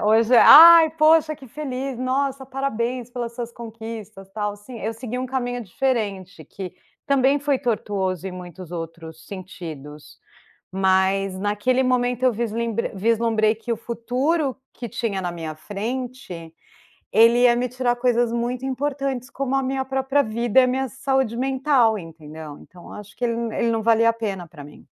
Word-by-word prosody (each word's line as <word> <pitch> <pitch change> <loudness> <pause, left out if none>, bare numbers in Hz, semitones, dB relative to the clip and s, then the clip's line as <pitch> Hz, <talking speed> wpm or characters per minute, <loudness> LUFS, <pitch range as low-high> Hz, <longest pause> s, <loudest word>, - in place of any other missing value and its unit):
É, - - -6
hoje, 225 +3 +4
"ai 330 +4 +10
poxa 310 -1 +3
que 270 -3 -13
feliz, 265 -1 -5
nossa 265 +1 -1
parabéns 255 -2 -3
pelas 240 -1 -6
suas 235 -1 -5
conquistas 220 -4 -9
tal", 210 -1 -3
sim, 225 +3 -11
eu 220 +3 -2
segui 245 +1 -6
um 255 +1 -3
caminho 245 -2 -3
diferente 205 -4 -3
que, 190 -3 -8 0.3
também 275 0 +3
foi 285 -1 0
tortuoso 195 -5 -2
em 190 - -5
muitos 180 -1 -10
outros 165 -1 -8
sentidos, 160 -6 -9 0.5
mas 190 0 +1
naquele 210 +6 +1
momento 250 0 0
eu 255 - +4
visl 225 0 -3 0.4
vislumbrei 220 +1 +2
que 230 +2 -5
o - - -1
futuro 255 +6 -1 0.2
que 240 - -7
tinha 225 -5 -3
na 175 - -2
minha 160 -2 -6
frente, 205 - -6 0.6
ele 230 +2 +5
ia 240 -1 +6
me 245 +1 -1
tirar 250 -1 0
coisas 240 -1 +1
muito 245 +2 -2
importantes 270 -1 -3
como 270 -1 -2
a 270 - +1
minha 265 0 -2
própria 270 +1 +1
vida 235 +2 +2
e - - +4
a - - +2
minha 260 +1 -1
saúde 265 -2 -1
mental, 260 -4 +2
entendeu. 155 -3 -10
Então 175 -1 -16
eu - - -11
acho 210 0 -11
que 250 - -7
ele 235 - 0
n 230 -1 -3
ele 230 0 +1
não 225 -1 -1
valia 230 0 +4
a - - +1
pena 200 -6 -4
para 155 -3 -12
mim. 145 - -15
235 Hz, 170 wpm, -22 LUFS, 200-260 Hz, 0.6 s, ai